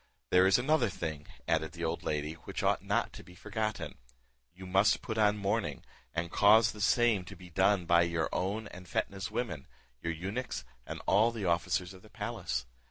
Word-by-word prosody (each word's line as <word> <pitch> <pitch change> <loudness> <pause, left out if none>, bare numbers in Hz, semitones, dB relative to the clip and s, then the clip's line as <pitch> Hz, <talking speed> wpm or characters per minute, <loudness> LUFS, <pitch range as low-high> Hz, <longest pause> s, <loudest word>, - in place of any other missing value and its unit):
There 90 +1 +6
is 95 - +5
another 130 -2 +2
thing," 80 -5 -5 0.2
added 80 -1 +1
the 85 -1 -6
old 80 +1 -1
lady, 75 0 -2
"which 80 - -6
ought - - +2
not - - 0
to - - -10
be 90 - -15
forgotten; 110 +2 -3 0.5
you 95 +2 -11
must 95 +3 +3
put 110 -1 -3
on 105 -1 +4
mourning, 105 +3 -1 0.3
and 85 +1 -3
cause 110 +2 +6
the 105 - -9
same 115 -2 +3
to 100 - -9
be 90 -1 -13
done 95 +1 +3
by 85 0 +5
your 85 -1 +1
own 100 +4 -1
and 90 0 -11
Fetnah's 95 +4 -2
women, 105 - -3 0.3
your 85 - -1
eunuchs, 95 - -4 0.2
and - - -6
all 105 +4 +5
the 115 -4 -4
officers 90 +1 0
of 95 - -14
the - - -17
palace. 60 - -3
95 Hz, 190 wpm, -31 LUFS, 85-105 Hz, 0.5 s, There